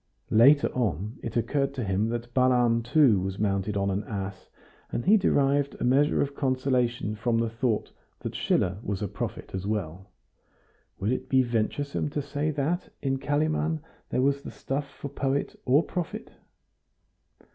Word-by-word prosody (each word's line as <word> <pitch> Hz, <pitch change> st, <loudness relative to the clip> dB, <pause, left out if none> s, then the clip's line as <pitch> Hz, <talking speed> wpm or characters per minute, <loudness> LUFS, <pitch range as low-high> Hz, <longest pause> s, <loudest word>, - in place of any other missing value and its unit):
Later 135 Hz, +6 st, +6 dB
on 105 Hz, -, -2 dB
it 115 Hz, -, -4 dB
occurred 140 Hz, +3 st, 0 dB
to 125 Hz, -, -2 dB
him 100 Hz, +2 st, 0 dB
that 120 Hz, 0 st, -4 dB
Balaam 125 Hz, -2 st, +3 dB
too 120 Hz, -3 st, +4 dB
was 95 Hz, +1 st, -3 dB
mounted 100 Hz, 0 st, 0 dB
on 100 Hz, 0 st, +1 dB
an 100 Hz, +2 st, -1 dB
ass, 100 Hz, -2 st, -5 dB, 0.4 s
and -, -, -2 dB
he 205 Hz, +4 st, +7 dB
derived 140 Hz, -7 st, +2 dB
a -, -, -2 dB
measure 140 Hz, +5 st, +3 dB
of 140 Hz, 0 st, -4 dB
consolation 130 Hz, -5 st, 0 dB
from 115 Hz, +2 st, 0 dB
the 115 Hz, -1 st, 0 dB
thought 115 Hz, -1 st, -1 dB, 0.3 s
that -, -, -4 dB
Schiller 90 Hz, +2 st, 0 dB
was 100 Hz, -2 st, -3 dB
a -, -, 0 dB
prophet 100 Hz, +1 st, -5 dB
as 95 Hz, +1 st, -3 dB
well. 95 Hz, -2 st, -3 dB, 0.9 s
Would 100 Hz, +4 st, -1 dB
it 130 Hz, -, -3 dB
be 130 Hz, -1 st, +4 dB
venturesome 125 Hz, +5 st, -1 dB
to 145 Hz, -, -2 dB
say 145 Hz, +2 st, -2 dB
that 155 Hz, +5 st, -1 dB
in 135 Hz, -1 st, 0 dB
Kalimann 155 Hz, +2 st, 0 dB, 0.3 s
there 130 Hz, -, +1 dB
was 140 Hz, +1 st, +2 dB
the -, -, -7 dB
stuff 140 Hz, +1 st, -4 dB
for -, -, -8 dB
poet 140 Hz, 0 st, -1 dB
or 140 Hz, +5 st, +4 dB
prophet? 175 Hz, -2 st, -5 dB
125 Hz, 165 wpm, -27 LUFS, 105-140 Hz, 0.9 s, he